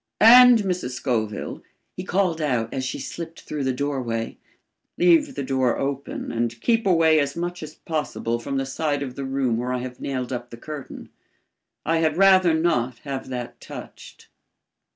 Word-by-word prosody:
And 245 -1 +9
Mrs. 180 -9 -2
Scoville," 110 -5 -2 0.3
he 180 - -5
called 180 -3 0
out 125 -6 -1
as 130 - -2
she 130 - -3
slipped 165 -1 -7
through 150 -2 -4
the 130 - +1
doorway, 125 -4 -3 0.6
"leave 175 -2 +4
the 140 - -3
door 130 -2 +1
open 140 0 -3
and 115 0 -2
keep 230 - +1
away 165 -3 +5
as 140 -1 -1
much 175 +1 -4
as 155 0 -8
possible 145 -7 -3
from 135 +3 -3
the 135 - -1
side 145 +1 -1
of 130 -3 -6
the 140 +1 -5
room 135 -3 0
where 125 +2 -2
I - - 0
have 125 0 -6
nailed 130 -2 -3
up 120 0 -5
the 115 - -10
curtain. 150 +2 -8 0.8
I 165 +1 +2
had 160 -1 +1
rather 185 -3 +6
not 130 -7 0
have 135 -2 -5
that 125 -2 -6
touched." - - -11
140 Hz, 175 wpm, -24 LUFS, 125-165 Hz, 0.8 s, And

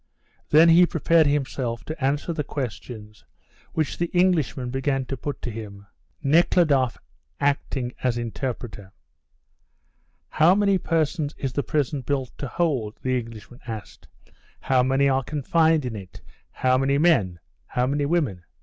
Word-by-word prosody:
Then 160 +3 +7
he 175 +2 +7
prepared 165 -1 +3
himself 130 -5 -1
to 155 -2 -6
answer 145 +5 0
the 155 -2 -2
questions 110 - -7 0.5
which 155 -2 -2
the 170 - +1
Englishman 155 -9 +1
began 135 0 -1
to 135 - -4
put 145 +3 -6
to 120 - -3
him, 100 -2 -9 0.4
Nekhludoff 140 - +3 0.4
acting 140 -3 -1
as 125 -2 0
interpreter. 115 -4 -5 1.4
"How 165 +4 +4
many 200 -2 +2
persons 155 -2 -1
is 135 -2 -3
the 145 - 0
prison 145 +2 -1
built 135 -1 -3
to 140 - -3
hold?" 130 -9 -1
the 130 0 +1
Englishman 115 +1 -11
asked. 110 -2 -8 0.5
"How 130 -1 +2
many 135 +2 +2
are 135 -1 +2
confined 155 +2 +1
in 120 -3 -4
it? 95 -4 -10 0.3
How 130 0 +1
many 135 +1 +2
men? 135 - +3 0.3
How 125 - 0
many 140 +2 0
women? 140 - 0
135 Hz, 140 wpm, -24 LUFS, 120-155 Hz, 1.4 s, Then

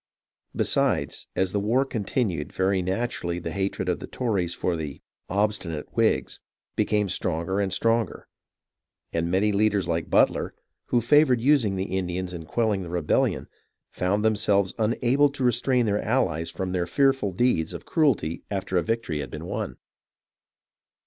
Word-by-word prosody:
Besides, - - 0
as 95 -1 +1
the 100 - 0
war 120 +7 +2
continued, 105 - -2
very 95 0 +1
naturally 95 -2 -2
the 90 - -4
hatred 95 -1 -2
of 90 - 0
the - - -7
Tories 100 -9 -1
for 90 -1 -1
the 75 -4 -5 0.3
"obstinate" 95 -6 -2
Whigs - - +1 0.4
became 105 -1 +1
stronger 90 +1 -1
and 100 -2 0
stronger, 115 +2 0 0.9
and 85 0 0
many 100 +4 +2
leaders 100 -3 +2
like 85 -1 -1
Butler, - - +2 0.3
who 120 - +2
favoured 130 0 +4
using 120 -6 +3
the 95 0 -3
Indians 90 -1 -2
in 85 -2 -7
quelling 105 +2 0
the 90 - -6
rebellion, 85 -3 0 0.4
found 100 +4 0
themselves 100 -3 +2
unable 120 +6 +3
to 140 -1 -5
re 125 - +5
strain 125 +1 +1
their 105 -1 +1
allies 95 -10 0
from 95 -1 -4
their 90 -2 -1
fearful 135 0 +2
deeds 90 -5 +1
of - - -8
cruelty 120 - +1
after 95 -2 -2
a - - +4
victory 110 -7 -2
had 70 - -4
been - - -7
won. - - -4
100 Hz, 155 wpm, -25 LUFS, 90-115 Hz, 0.9 s, re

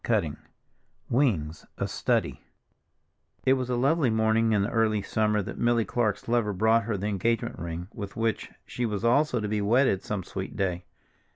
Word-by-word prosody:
Wings - - +1 0.8
Wings 95 - 0
A - - -1
Study - - -1 1.0
I 130 - +4
IT - - +7
was 130 -1 -2
a 125 - +1
lovely 140 +2 +2
morning 110 0 +2
in 105 -2 +3
the 105 - -2
early 110 -3 +1
summer 105 0 +1
that - - -7
Milly 120 -1 +2
Clark's 110 -4 -1
lover 115 -3 +1
brought 110 +3 +3
her 110 -3 -1
the 100 - -4
engagement 115 +3 -1
ring 85 +1 -5
with 100 -3 -7
which 115 -1 -1 0.2
she 125 - -4
was 110 -1 -2
also 125 +1 +3
to 105 - -2
be 105 0 -1
wedded 110 -1 +3
some 105 -3 -4
sweet 95 +2 -6
day. 90 -3 -2
110 Hz, 180 wpm, -27 LUFS, 100-120 Hz, 1.0 s, IT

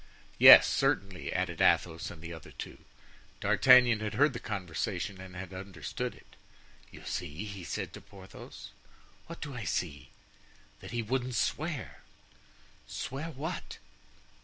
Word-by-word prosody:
"Yes, - - +11
certainly," 95 -4 0
added - - -2
Athos 80 0 +2
and 80 -1 -11
the 85 0 -6
other 80 - -11
two. - - -9 0.6
D'Artagnan 125 -3 +6
had 110 0 -4
heard 145 +3 +4
the 120 - -5
conversation 95 0 -4
and 95 -1 -11
had 95 +1 -7
understood 95 -4 -5
it. - - -20 0.5
"You - - -13
see?" 80 +9 -4
he 100 -3 -7
said - - -5
to - - -9
Porthos. 100 -2 -12 0.6
"What 165 - -9
do 145 -3 -6
I 120 -3 -5
see?" 75 -4 -3 0.7
"That - - -10
he 120 -1 -2
wouldn't 125 +2 -2
swear." 155 -2 -2 0.9
"Swear 140 +5 -5
what?" 160 +4 -6
100 Hz, 135 wpm, -30 LUFS, 90-125 Hz, 0.9 s, Yes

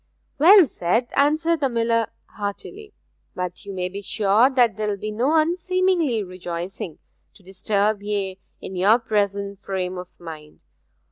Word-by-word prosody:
'Well 370 +4 +8
said!' 225 +5 -1
answered 310 +3 +2
the 275 -2 +1
miller 230 -1 +1 0.2
heartily. 300 - -7 0.4
'But 180 +2 -5
you 200 - -6
may 180 -1 -1
be 195 +2 -7
sure 210 +5 +3
that 245 -6 +3
there 215 0 -2
will 205 -1 -1
be 215 +2 -5
no 250 +9 +1
unseemly 340 - +1
rejoicing, 180 -2 -6 0.4
to 200 - -20
disturb 200 +2 -1
ye 200 -2 -3 0.2
in 190 - -8
your 200 +5 +4
present 200 -3 -2
frame 185 -2 -3
of 180 0 -12
mind. 155 -3 -11
210 Hz, 145 wpm, -23 LUFS, 190-260 Hz, 0.4 s, Well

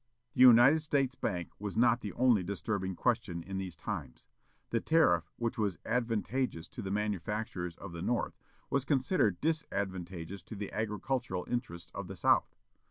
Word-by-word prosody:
The - - -8
United 130 +5 +8
States 140 -4 +1
Bank 90 -9 -3
was 105 -1 -4
not 120 0 +4
the 105 - -4
only 120 -5 +4
disturbing 95 +1 -2
question 110 -6 0
in 95 +1 -4
these 95 -3 -5
times. 80 - -6 0.4
The 115 - +2
tariff, 90 - +3
which 115 -1 -2
was 100 -6 0
advantageous 120 -4 -1
to - - -7
the 95 - -4
manufacturers 105 -3 -2
of - - -8
the 85 -1 -6
North, 120 +6 -1 0.4
was 140 - +2
considered 135 - +2
disadvantageous 95 - -3
to 110 - -9
the 100 -1 -6
agricultural 105 -2 -2
interests 105 -9 -4
of 100 -2 -5
the 95 - -7
South. - - +2
105 Hz, 160 wpm, -32 LUFS, 90-125 Hz, 0.4 s, United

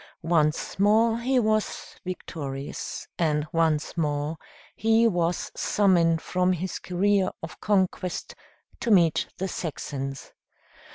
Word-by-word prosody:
Once 160 0 +1
more 225 +3 +4
he 255 +2 +1
was 215 -2 -1
victorious 145 -6 -5
and 150 -3 +1
once 160 -2 +1
more 150 -1 -1 0.4
he 225 +1 +4
was 175 -4 0
summoned 170 -5 +3
from 180 0 +1
his 180 +1 -3
career 190 +1 +1
of 160 - -8
conquest 185 -3 0 0.5
to 235 - -2
meet 170 -6 +4
the 190 - -2
Saxons. 140 -6 -5
180 Hz, 110 wpm, -26 LUFS, 160-205 Hz, 0.5 s, more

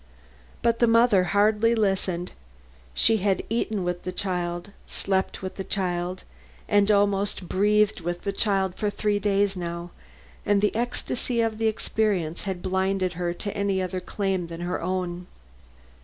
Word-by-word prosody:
But 230 -1 +2
the 235 - +5
mother 230 -5 +5
hardly 210 +4 +3
listened. 190 -4 0 0.6
She 220 - +4
had 195 -1 +1
eaten 220 -3 -1
with 175 0 -2
the 185 - -4
child, 180 0 -3 0.2
slept 190 -1 -1
with 185 - -5
the 195 - -3
child 180 -2 -2 0.4
and 205 -1 +3
almost 200 -2 +2
breathed 210 +1 +2
with 175 +1 -3
the 200 - -1
child 195 -3 +1
for 210 +2 -1
three 205 0 0
days 200 -1 +2
now, 170 -1 -5 0.5
and 205 -1 +3
the 210 +1 +1
ecstasy 240 +1 -1
of 225 -1 0
the 225 - +2
experience 205 -7 -1
had 190 -3 -4
blinded 190 -1 0
her 175 0 -2
to 205 +2 -5
any 200 -2 0
other 185 0 -2
claim 190 -1 -2
than 165 0 -7
her 175 +1 -2
own. 180 0 -3
195 Hz, 155 wpm, -26 LUFS, 180-210 Hz, 0.6 s, the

